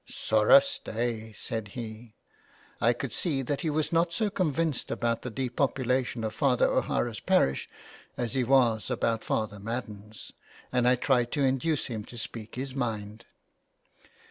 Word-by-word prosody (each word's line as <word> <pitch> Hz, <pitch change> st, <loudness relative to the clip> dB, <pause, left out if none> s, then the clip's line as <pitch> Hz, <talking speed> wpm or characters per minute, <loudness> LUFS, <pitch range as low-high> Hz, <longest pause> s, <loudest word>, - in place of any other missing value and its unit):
'' -, -, -45 dB, 0.2 s
Sorra 275 Hz, -, +7 dB
sta>'," 115 Hz, -, -3 dB
said 110 Hz, -2 st, -4 dB
he. 110 Hz, -1 st, -7 dB, 0.7 s
I 115 Hz, -, +5 dB
could 120 Hz, 0 st, -4 dB
see 145 Hz, -7 st, 0 dB
that 140 Hz, +2 st, -2 dB
he 160 Hz, -, 0 dB
was 155 Hz, +2 st, 0 dB
not 170 Hz, +1 st, +3 dB
so 210 Hz, +4 st, 0 dB
convinced 165 Hz, -, 0 dB
about 115 Hz, -1 st, -1 dB
the 125 Hz, -, -5 dB
depopulation 130 Hz, -1 st, -1 dB
of 110 Hz, -1 st, -2 dB
Father 130 Hz, 0 st, +3 dB
O'Hara's -, -, 0 dB
parish 65 Hz, 0 st, +2 dB, 0.5 s
as 120 Hz, -3 st, -2 dB
he 130 Hz, -, +2 dB
was 120 Hz, -4 st, +3 dB
about 115 Hz, -1 st, 0 dB
Father 105 Hz, -2 st, -2 dB
Madden's, 110 Hz, -1 st, -6 dB, 0.4 s
and 125 Hz, -1 st, +2 dB
I 125 Hz, -, +6 dB
tried 125 Hz, -1 st, +1 dB
to 145 Hz, -, +1 dB
induce 135 Hz, +4 st, +1 dB
him 110 Hz, -4 st, -4 dB
to 120 Hz, -, -11 dB
speak 115 Hz, -1 st, -7 dB
his 130 Hz, +1 st, -4 dB
mind. 110 Hz, -3 st, -4 dB
120 Hz, 155 wpm, -28 LUFS, 110-135 Hz, 0.7 s, Sorra